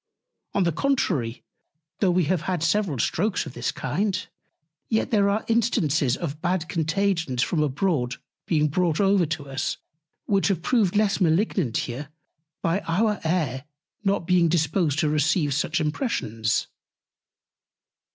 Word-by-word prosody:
On 200 Hz, -, +3 dB
the 170 Hz, -, +2 dB
contrary, 155 Hz, -, 0 dB, 0.6 s
though 195 Hz, -, +3 dB
we 180 Hz, 0 st, +3 dB
have 170 Hz, +1 st, 0 dB
had 180 Hz, -4 st, -1 dB
several 170 Hz, -3 st, +1 dB
Strokes 185 Hz, -, 0 dB
of -, -, -8 dB
this 120 Hz, -1 st, -2 dB
kind, 190 Hz, +9 st, -2 dB, 0.6 s
yet 220 Hz, -1 st, 0 dB
there 200 Hz, -3 st, +3 dB
are 205 Hz, +2 st, 0 dB
Instances 160 Hz, -, +2 dB
of 155 Hz, -3 st, -5 dB
bad 175 Hz, -1 st, 0 dB
Contagions 165 Hz, -6 st, 0 dB
from 160 Hz, +3 st, 0 dB
abroad 140 Hz, -4 st, 0 dB, 0.3 s
being 150 Hz, -3 st, +2 dB
brought 165 Hz, +1 st, 0 dB
over 195 Hz, -4 st, +3 dB
to 145 Hz, -2 st, -4 dB
us, 135 Hz, +1 st, -2 dB, 0.5 s
which 195 Hz, -2 st, +2 dB
have 185 Hz, -5 st, -1 dB
proved 210 Hz, -5 st, +2 dB
less 210 Hz, -1 st, +2 dB
malignant 170 Hz, -, +1 dB
here 140 Hz, +5 st, -6 dB, 0.5 s
by 165 Hz, +4 st, +1 dB
our 210 Hz, +5 st, +1 dB
Air 160 Hz, -6 st, -1 dB, 0.4 s
not 195 Hz, -3 st, +1 dB
being 175 Hz, -1 st, +3 dB
disposed 160 Hz, -2 st, +1 dB
to 155 Hz, -, +2 dB
receive 150 Hz, 0 st, +1 dB
such 155 Hz, +4 st, 0 dB
Impressions. 150 Hz, -, -1 dB
170 Hz, 140 wpm, -25 LUFS, 150-195 Hz, 0.6 s, On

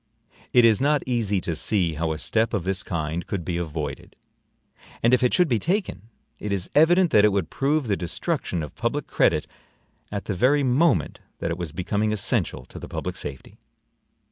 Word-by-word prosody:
It 125 Hz, -2 st, +6 dB
is 115 Hz, +1 st, +4 dB
not 145 Hz, +1 st, +2 dB
easy 115 Hz, -6 st, 0 dB
to 85 Hz, -, -3 dB
see 90 Hz, -1 st, 0 dB
how 80 Hz, +1 st, -1 dB
a 80 Hz, -, -3 dB
step 110 Hz, +6 st, 0 dB
of 100 Hz, -, -1 dB
this 95 Hz, +1 st, -1 dB
kind 85 Hz, -2 st, -3 dB
could 95 Hz, -5 st, -3 dB
be 85 Hz, -2 st, -2 dB
avoided; 80 Hz, -3 st, -5 dB, 0.9 s
and 120 Hz, +2 st, +4 dB
if 125 Hz, -, +4 dB
it 125 Hz, -, +3 dB
should 180 Hz, -2 st, +3 dB
be 120 Hz, -6 st, +1 dB
taken, 175 Hz, -, -2 dB, 0.3 s
it 105 Hz, -, -4 dB
is 95 Hz, -2 st, -2 dB
evident 170 Hz, +3 st, +5 dB
that 105 Hz, -, +5 dB
it 105 Hz, -, +5 dB
would 95 Hz, -5 st, -1 dB
prove 145 Hz, +1 st, +1 dB
the 105 Hz, -4 st, +1 dB
destruction 85 Hz, -1 st, -2 dB
of 75 Hz, -, -8 dB
public -, -, -2 dB
credit -, -, +2 dB, 0.7 s
at 100 Hz, -1 st, -4 dB
the 100 Hz, -, -2 dB
very 135 Hz, +10 st, +3 dB
moment 130 Hz, -, +2 dB, 0.2 s
that 85 Hz, -, -3 dB
it 85 Hz, -, -2 dB
was 85 Hz, -4 st, -4 dB
becoming 100 Hz, +5 st, -1 dB
essential 95 Hz, -10 st, -1 dB
to -, -, -11 dB
the -, -, -9 dB
public -, -, -4 dB
safety. 70 Hz, -2 st, -7 dB
105 Hz, 195 wpm, -24 LUFS, 85-125 Hz, 0.9 s, It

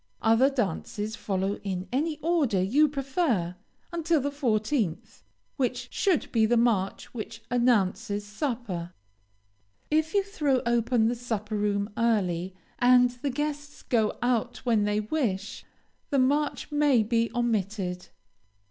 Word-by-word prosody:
Other 225 Hz, +5 st, +5 dB
dances 215 Hz, -, -2 dB
follow 195 Hz, 0 st, -2 dB
in 190 Hz, -2 st, -3 dB
any 300 Hz, +4 st, 0 dB
order 310 Hz, -, +2 dB
you 260 Hz, +12 st, +4 dB
prefer 270 Hz, -, -1 dB, 0.4 s
until 335 Hz, -1 st, +1 dB
the 285 Hz, +1 st, -2 dB
fourteenth, 220 Hz, -, -1 dB, 0.4 s
which 250 Hz, -1 st, -1 dB
should 370 Hz, -8 st, +1 dB
be 220 Hz, -2 st, +3 dB
the 240 Hz, +1 st, +3 dB
march 220 Hz, -5 st, 0 dB
which 225 Hz, -1 st, -7 dB
announces 210 Hz, -4 st, +1 dB
supper. 210 Hz, -, -4 dB, 1.0 s
If 315 Hz, +3 st, +1 dB
you 400 Hz, -, +4 dB
throw 300 Hz, -, 0 dB
open 235 Hz, -1 st, +2 dB
the 235 Hz, -, +1 dB
supper 225 Hz, -3 st, -4 dB
room, 205 Hz, 0 st, 0 dB
early, 190 Hz, -6 st, 0 dB, 0.2 s
and 245 Hz, 0 st, +5 dB
the 250 Hz, +3 st, -4 dB
guests 290 Hz, +1 st, -4 dB
go 220 Hz, -3 st, +1 dB
out 245 Hz, -2 st, 0 dB
when 225 Hz, -4 st, +3 dB
they 210 Hz, 0 st, +1 dB
wish, 215 Hz, -5 st, -2 dB, 0.4 s
the 285 Hz, -, +1 dB
march 285 Hz, +4 st, +1 dB
may 290 Hz, -6 st, +3 dB
be 230 Hz, +1 st, +1 dB
omitted. 200 Hz, -6 st, -1 dB
235 Hz, 130 wpm, -27 LUFS, 205-275 Hz, 1.0 s, Other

